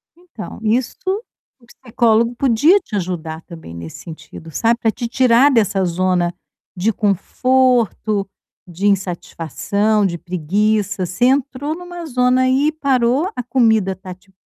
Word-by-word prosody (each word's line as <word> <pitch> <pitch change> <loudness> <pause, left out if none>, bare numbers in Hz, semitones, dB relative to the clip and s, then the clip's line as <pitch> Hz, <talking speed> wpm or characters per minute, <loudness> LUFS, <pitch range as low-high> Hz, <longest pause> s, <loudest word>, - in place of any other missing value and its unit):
Então, 345 -10 -10
isto 260 - -1 0.4
o 240 - -23
psicólogo 235 -1 0
podia 275 - +4
te 220 - -8
ajudar 170 -4 -4
também 160 - -11
nesse 85 -1 -9
sentido, 160 0 -11
sabe, 230 +8 +1
para 225 - +1
te 235 +1 -5
tirar 255 +3 +4
dessa 205 -5 +2
zona 180 0 0 0.4
de 200 +5 0
conforto, 220 0 +1 0.4
de 180 +4 -5
insatisfação, 200 +2 0
de 170 -3 -1
preguiça, 195 +3 -1
você 180 +8 0
entrou 280 +2 0
em 360 - -11
uma 350 -1 -8
zona 250 -2 +2
aí 265 +4 +2
parou, 275 - +1
a - - -2
comida 220 -6 +2
está 185 0 -9
te 190 +2 -24
220 Hz, 135 wpm, -18 LUFS, 185-255 Hz, 0.4 s, podia